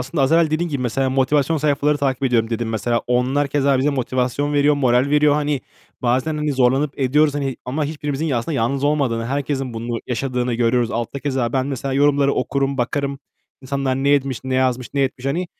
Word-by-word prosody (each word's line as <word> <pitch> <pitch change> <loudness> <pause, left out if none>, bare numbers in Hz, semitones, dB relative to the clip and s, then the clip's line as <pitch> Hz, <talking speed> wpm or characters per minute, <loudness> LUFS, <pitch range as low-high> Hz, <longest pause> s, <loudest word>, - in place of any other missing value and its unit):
aslında 135 +4 -2
az 135 +3 +2
evvel 165 -1 +4
dediğin 165 +3 0
gibi, 140 -5 -3
mesela 130 +2 0
"motivasyon 140 +4 +2
sayfaları 145 0 +1
takip 135 -2 -1
ediyorum." 120 -4 +1
dedin 115 0 -2
mesela. 115 +2 -1
Onlar 130 +4 +1
keza 140 -1 +2
bize 140 +3 +2
motivasyon 130 +1 -1
veriyor, 145 0 +3
moral 130 -1 +2
veriyor, 150 0 +4
hani, 150 -2 0 0.4
bazen, 130 +6 +1
hani, 150 -1 -1
zorlanıp 135 +3 +1
ediyoruz, 145 +3 +2
hani, 135 -3 -2
ama 145 +4 -2
hiçbirimizin 150 0 -3
aslında 125 +4 -1
yalnız 135 +4 0
olmadığını, 130 -6 0
herkesin 135 -2 -2
bunu 115 +1 -3
yaşadığını 125 0 -1
görüyoruz. 120 0 +1
Altta 120 +4 -3
keza 130 -4 -1
ben 130 -1 0
mesela 135 -1 -3
yorumları 140 0 +3
okurum, 135 +2 -1
bakarım. 140 +3 -1 0.4
İnsanlar 135 0 -1
ne 135 +1 +1
etmiş, 135 -3 +1
ne 130 0 -2
yazmış, 130 -1 0
ne 140 - +2
etmiş 130 0 -3
hani. 175 +6 -1
135 Hz, 190 wpm, -20 LUFS, 125-145 Hz, 0.4 s, evvel